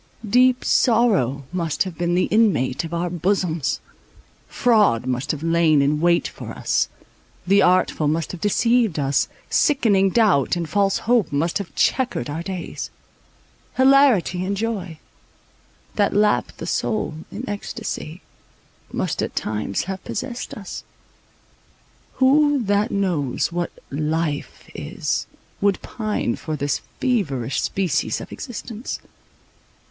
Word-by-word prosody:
Deep 250 Hz, +3 st, +4 dB
sorrow 205 Hz, -, +3 dB
must 170 Hz, -4 st, 0 dB
have 185 Hz, -3 st, -7 dB
been 175 Hz, +1 st, 0 dB
the 180 Hz, -, +3 dB
inmate 180 Hz, -, +2 dB
of 165 Hz, -, -6 dB
our 170 Hz, +1 st, -1 dB
bosoms; 170 Hz, -4 st, 0 dB, 0.7 s
fraud 210 Hz, -, +3 dB
must 130 Hz, +2 st, -2 dB
have 150 Hz, 0 st, -2 dB
lain 165 Hz, -2 st, +3 dB
in 145 Hz, +2 st, +2 dB
wait 170 Hz, 0 st, +3 dB
for -, -, -9 dB
us; -, -, 0 dB, 0.6 s
the 200 Hz, +2 st, +4 dB
artful 180 Hz, -4 st, +3 dB
must 160 Hz, 0 st, -1 dB
have 180 Hz, -, -8 dB
deceived 230 Hz, -2 st, +2 dB
us; 140 Hz, -1 st, +1 dB, 0.2 s
sickening 210 Hz, -9 st, +3 dB
doubt 195 Hz, -, +3 dB
and 170 Hz, -2 st, -3 dB
false 200 Hz, +2 st, +2 dB
hope 235 Hz, -6 st, +2 dB
must 160 Hz, +6 st, 0 dB
have 200 Hz, -, -7 dB
chequered 245 Hz, -, +1 dB
our 160 Hz, +3 st, -3 dB
days; 185 Hz, -1 st, -5 dB, 0.9 s
hilarity 260 Hz, -9 st, +4 dB
and 200 Hz, +2 st, -2 dB
joy, 195 Hz, -7 st, -3 dB, 1.0 s
that 205 Hz, -2 st, +1 dB
lap 210 Hz, 0 st, +2 dB
the -, -, -6 dB
soul 215 Hz, -6 st, -1 dB, 0.2 s
in 235 Hz, +6 st, -6 dB
ecstasy, 185 Hz, -4 st, -5 dB, 0.7 s
must -, -, -2 dB
at -, -, -3 dB
times 105 Hz, -2 st, -2 dB
have 190 Hz, 0 st, -5 dB
possessed 245 Hz, +2 st, -5 dB
us. 200 Hz, -3 st, -7 dB, 1.3 s
Who 285 Hz, 0 st, +4 dB
that 205 Hz, +1 st, +1 dB
knows 170 Hz, -9 st, 0 dB
what 175 Hz, 0 st, -2 dB, 0.2 s
"life" 155 Hz, +1 st, -2 dB
is, -, -, -3 dB, 0.3 s
would 200 Hz, -1 st, +2 dB
pine 215 Hz, -, -2 dB
for 155 Hz, -, -4 dB
this 145 Hz, -1 st, -1 dB, 0.2 s
feverish 145 Hz, -, 0 dB
species 190 Hz, -4 st, 0 dB
of -, -, -9 dB
existence? 235 Hz, -2 st, -6 dB
185 Hz, 125 wpm, -22 LUFS, 155-215 Hz, 1.3 s, Deep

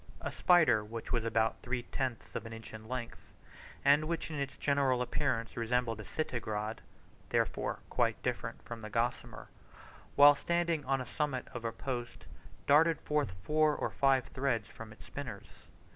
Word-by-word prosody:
A -, -, -3 dB
spider 155 Hz, -12 st, +5 dB
which 115 Hz, +2 st, -7 dB
was 120 Hz, -2 st, +1 dB
about 115 Hz, -1 st, +1 dB
three 120 Hz, 0 st, -2 dB
tenths 130 Hz, -2 st, -4 dB
of 115 Hz, -, -4 dB
an 115 Hz, -, -8 dB
inch 115 Hz, 0 st, -9 dB
in 110 Hz, 0 st, -9 dB
length, 120 Hz, -1 st, -5 dB, 0.7 s
and 145 Hz, +2 st, +6 dB
which 165 Hz, -1 st, -2 dB
in 155 Hz, -, -4 dB
its 140 Hz, -1 st, -3 dB
general 140 Hz, -3 st, +2 dB
appearance 125 Hz, -2 st, -1 dB
resembled 115 Hz, -1 st, 0 dB
a -, -, -6 dB
Citigrade 110 Hz, -6 st, -3 dB, 0.5 s
(therefore -, -, 0 dB
quite -, -, +1 dB
different -, -, -3 dB
from 120 Hz, -1 st, -7 dB
the 110 Hz, -, -6 dB
gossamer), 115 Hz, +2 st, -2 dB, 0.7 s
while 145 Hz, +1 st, +9 dB
standing 170 Hz, +1 st, 0 dB
on 135 Hz, +1 st, +2 dB
the -, -, -5 dB
summit 135 Hz, -2 st, -2 dB
of 120 Hz, -, -6 dB
a 115 Hz, -, -1 dB
post, 120 Hz, 0 st, -5 dB, 0.4 s
darted 160 Hz, +2 st, +5 dB
forth 150 Hz, -10 st, 0 dB
four 155 Hz, 0 st, +3 dB
or -, -, -2 dB
five 135 Hz, -2 st, +3 dB
threads 130 Hz, -6 st, -1 dB
from 115 Hz, -1 st, -10 dB
its 110 Hz, -, -14 dB
spinners. -, -, -7 dB
125 Hz, 165 wpm, -33 LUFS, 115-145 Hz, 0.7 s, while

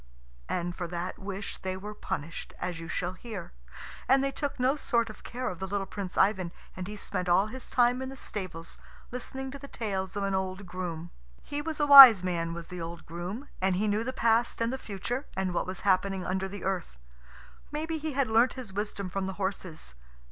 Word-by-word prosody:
And 175 Hz, 0 st, -1 dB
for 175 Hz, -2 st, -3 dB
that 175 Hz, +1 st, -4 dB
wish 195 Hz, +1 st, -5 dB
they 185 Hz, 0 st, -3 dB
were 210 Hz, +2 st, -7 dB
punished, 165 Hz, -5 st, -5 dB
as 175 Hz, -2 st, -3 dB
you 165 Hz, -, -7 dB
shall 175 Hz, +1 st, -2 dB
hear. 200 Hz, -2 st, -7 dB, 0.6 s
And 270 Hz, +1 st, +5 dB
they 275 Hz, -, +1 dB
took 280 Hz, 0 st, -3 dB
no 255 Hz, +3 st, +3 dB
sort 235 Hz, -6 st, 0 dB
of -, -, -15 dB
care 250 Hz, +1 st, -4 dB
of 180 Hz, -, -4 dB
the 190 Hz, -, -3 dB
little 200 Hz, 0 st, -1 dB
Prince 195 Hz, -2 st, -6 dB
Ivan, 190 Hz, -3 st, +3 dB, 0.2 s
and 185 Hz, -1 st, -5 dB
he 210 Hz, -, -6 dB
spent 185 Hz, -3 st, -3 dB
all 185 Hz, +3 st, +5 dB
his 250 Hz, +4 st, -7 dB
time 245 Hz, +1 st, +3 dB
in 260 Hz, -, -4 dB
the 270 Hz, -, -9 dB
stables, 185 Hz, -8 st, -6 dB, 0.3 s
listening 265 Hz, +2 st, -5 dB
to 280 Hz, -, -8 dB
the 280 Hz, -, -9 dB
tales 195 Hz, -6 st, -3 dB
of 200 Hz, -, -1 dB
an 195 Hz, 0 st, 0 dB
old 190 Hz, +1 st, -2 dB
groom. 175 Hz, -2 st, -5 dB, 0.3 s
He 290 Hz, 0 st, -3 dB
was 315 Hz, 0 st, -4 dB
a 295 Hz, -, +3 dB
wise 265 Hz, -9 st, +12 dB
man 170 Hz, -2 st, -1 dB
was 170 Hz, 0 st, -7 dB
the 180 Hz, -1 st, -6 dB
old 165 Hz, 0 st, -6 dB
groom, 180 Hz, -, -5 dB
and 190 Hz, -1 st, +2 dB
he 210 Hz, +4 st, +1 dB
knew 210 Hz, +2 st, +1 dB
the 260 Hz, -, -2 dB
past 235 Hz, -2 st, +2 dB
and 230 Hz, +2 st, 0 dB
the 265 Hz, -, -3 dB
future, 240 Hz, +7 st, -4 dB
and 190 Hz, -1 st, 0 dB
what 175 Hz, -, -1 dB
was 185 Hz, -1 st, -5 dB
happening 190 Hz, -1 st, +2 dB
under 190 Hz, +1 st, -1 dB
the 200 Hz, 0 st, -8 dB
earth. 185 Hz, -, -2 dB, 0.7 s
Maybe 315 Hz, +2 st, -2 dB
he 310 Hz, 0 st, -3 dB
had 275 Hz, -1 st, +2 dB
learnt 230 Hz, +3 st, +4 dB
his 245 Hz, -7 st, -7 dB
wisdom 205 Hz, -1 st, -3 dB
from 190 Hz, +1 st, -2 dB
the 190 Hz, -, -3 dB
horses. 190 Hz, -, -4 dB
195 Hz, 215 wpm, -29 LUFS, 185-245 Hz, 0.7 s, wise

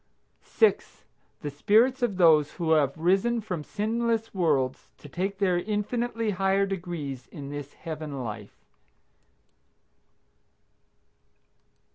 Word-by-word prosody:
6. 445 Hz, -, +1 dB, 0.4 s
The 145 Hz, -2 st, -4 dB
spirits 230 Hz, -, +3 dB
of 220 Hz, -6 st, 0 dB
those 155 Hz, -5 st, +5 dB
who 165 Hz, -3 st, -2 dB
have 145 Hz, -3 st, +3 dB
risen 195 Hz, +8 st, +2 dB
from 185 Hz, -8 st, -4 dB
sinless 225 Hz, +3 st, -1 dB
worlds 145 Hz, -9 st, 0 dB
to -, -, -13 dB
take 190 Hz, +6 st, -3 dB
their 185 Hz, -3 st, +2 dB
infinitely 220 Hz, +3 st, -1 dB
higher 195 Hz, +1 st, +2 dB
degrees 170 Hz, -9 st, -5 dB
in 140 Hz, -1 st, -9 dB
this 145 Hz, -1 st, -7 dB
Heaven 155 Hz, -4 st, -6 dB
life. 105 Hz, -3 st, -7 dB
180 Hz, 105 wpm, -27 LUFS, 150-215 Hz, 0.4 s, those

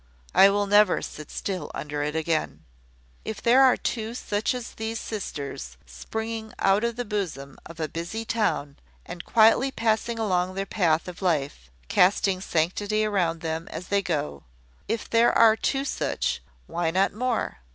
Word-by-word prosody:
I 195 Hz, -, +8 dB
will 205 Hz, +1 st, +1 dB
never 205 Hz, -1 st, +4 dB
sit 150 Hz, -1 st, -8 dB
still 190 Hz, -2 st, -4 dB
under 150 Hz, 0 st, -4 dB
it 150 Hz, +1 st, -2 dB
again. 160 Hz, 0 st, -1 dB, 0.6 s
If 220 Hz, -, -5 dB
there 245 Hz, +3 st, +5 dB
are 260 Hz, -2 st, +6 dB
two 225 Hz, 0 st, -3 dB
such 210 Hz, 0 st, -1 dB
as 245 Hz, -2 st, -6 dB
these 225 Hz, +1 st, -4 dB
sisters, 140 Hz, -, -6 dB
springing 220 Hz, -, -5 dB
out 195 Hz, +3 st, +3 dB
of 235 Hz, -1 st, 0 dB
the 245 Hz, 0 st, -3 dB
bosom 175 Hz, -10 st, -4 dB
of 165 Hz, 0 st, -12 dB
a 155 Hz, -, -1 dB
busy 170 Hz, +9 st, -5 dB
town, 205 Hz, -12 st, -1 dB, 0.3 s
and 175 Hz, -, -7 dB
quietly 230 Hz, +4 st, +4 dB
passing 230 Hz, -1 st, 0 dB
along 185 Hz, -4 st, 0 dB
their 195 Hz, 0 st, -2 dB
path 170 Hz, -6 st, +1 dB
of 180 Hz, +1 st, -8 dB
life, 145 Hz, -, -1 dB, 0.2 s
casting 185 Hz, -, +3 dB
sanctity 200 Hz, +6 st, 0 dB
around 175 Hz, -6 st, 0 dB
them 160 Hz, 0 st, -3 dB
as 180 Hz, -, -7 dB
they 200 Hz, 0 st, +2 dB
go, 150 Hz, -, -3 dB, 0.5 s
if 225 Hz, +1 st, -2 dB
there 230 Hz, +1 st, +4 dB
are 225 Hz, -1 st, +7 dB
two 270 Hz, +4 st, -1 dB
such, -, -, -1 dB, 0.2 s
why 165 Hz, 0 st, -1 dB
not 190 Hz, +4 st, +1 dB
more? 245 Hz, +2 st, -2 dB
195 Hz, 160 wpm, -26 LUFS, 165-220 Hz, 0.6 s, I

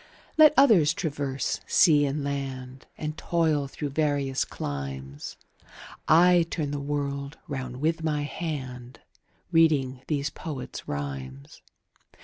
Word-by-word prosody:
Let 310 Hz, -1 st, +7 dB
others 215 Hz, -, +6 dB
traverse 140 Hz, -5 st, -2 dB
sea 150 Hz, -5 st, +5 dB
and 140 Hz, +1 st, -2 dB
land, 135 Hz, -2 st, -5 dB
And 155 Hz, 0 st, -4 dB
toil 160 Hz, -4 st, +1 dB
through 145 Hz, +2 st, -5 dB
various 140 Hz, -3 st, 0 dB
climes, 70 Hz, 0 st, -6 dB, 0.2 s
30 -, -, -28 dB, 0.4 s
I 175 Hz, +1 st, +6 dB
turn 150 Hz, -4 st, -2 dB
the 145 Hz, -, -2 dB
world 140 Hz, +1 st, -3 dB
round 130 Hz, -4 st, -5 dB
with 160 Hz, +1 st, 0 dB
my 150 Hz, -2 st, 0 dB
hand 130 Hz, -6 st, -6 dB, 0.5 s
Reading 145 Hz, -6 st, +3 dB
these 145 Hz, -1 st, -1 dB
poets' 145 Hz, -5 st, -7 dB
rhymes. 70 Hz, -1 st, -6 dB
140 Hz, 120 wpm, -27 LUFS, 130-155 Hz, 0.5 s, Let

